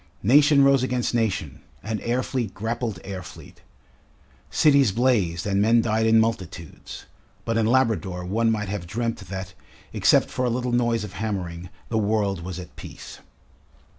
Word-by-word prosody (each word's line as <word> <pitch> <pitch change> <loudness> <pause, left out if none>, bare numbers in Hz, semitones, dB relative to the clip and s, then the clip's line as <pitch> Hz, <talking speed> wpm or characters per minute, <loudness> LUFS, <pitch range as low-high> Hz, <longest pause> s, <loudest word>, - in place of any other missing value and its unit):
Nation 140 +5 +5
rose 135 -1 +5
against 125 -1 -1
nation 105 - -1 0.2
and 110 -1 -3
air 125 +2 0
fleet 120 -7 -3
grappled 115 +2 -3
air 95 -1 -6
fleet, - - -13 0.9
cities 140 -7 +4
blazed 105 -8 +1
and 100 -1 +1
men 115 +3 +4
died 110 0 +1
in 110 0 +5
multitudes; 95 -7 -4 0.4
but 115 - -1
in 115 -1 +2
Labrador 110 -8 +1
one 115 +5 +1
might 105 -2 -2
have 95 -3 -5
dreamt 115 +4 -2
that, 95 0 -7 0.4
except - - +3
for 130 - -2
a 125 - +1
little 125 +1 -2
noise 120 -2 +1
of 100 -3 -8
hammering, 90 -5 -4 0.2
the 110 - 0
world 100 -3 0
was 90 +1 -6
at 90 -1 -10
peace. - - -10
110 Hz, 160 wpm, -24 LUFS, 95-120 Hz, 0.9 s, Nation